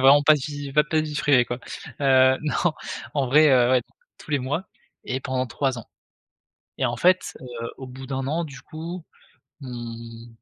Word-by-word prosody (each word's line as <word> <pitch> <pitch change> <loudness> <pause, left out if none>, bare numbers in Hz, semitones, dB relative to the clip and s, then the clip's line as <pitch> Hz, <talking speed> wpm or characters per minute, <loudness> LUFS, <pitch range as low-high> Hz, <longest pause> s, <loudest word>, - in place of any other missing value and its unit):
Vraiment 140 +2 +7
pas 155 +1 +7
de 150 - -2
vie, 145 -2 -5
pas 150 +2 +5
pas 155 +1 -2
de - - -2
vie 150 - -6
privée, 135 -3 +4
quoi, 120 +1 -4 0.4
heu, 130 -1 +5
non 150 - -1 0.6
en 140 -2 +1
vrai, 150 +4 +6
heu, 125 -2 +5
ouais 130 -1 +4 0.4
tous - - -13
les 145 - +2
mois 145 +9 -2 0.4
et 130 - -2
pendant 130 -1 -1
3 130 +2 -1
ans. 115 - -9 0.9
Et - - +2
en - - 0
fait, 185 +1 +2
heu, 120 -2 -6
au 130 - -8
bout 130 +1 -9
d'1 135 0 -3
an, 165 +4 0
du 140 -4 -9
coup, 165 +2 -7 0.6
mmh, 115 -2 -8
135 Hz, 195 wpm, -24 LUFS, 125-150 Hz, 0.9 s, Vraiment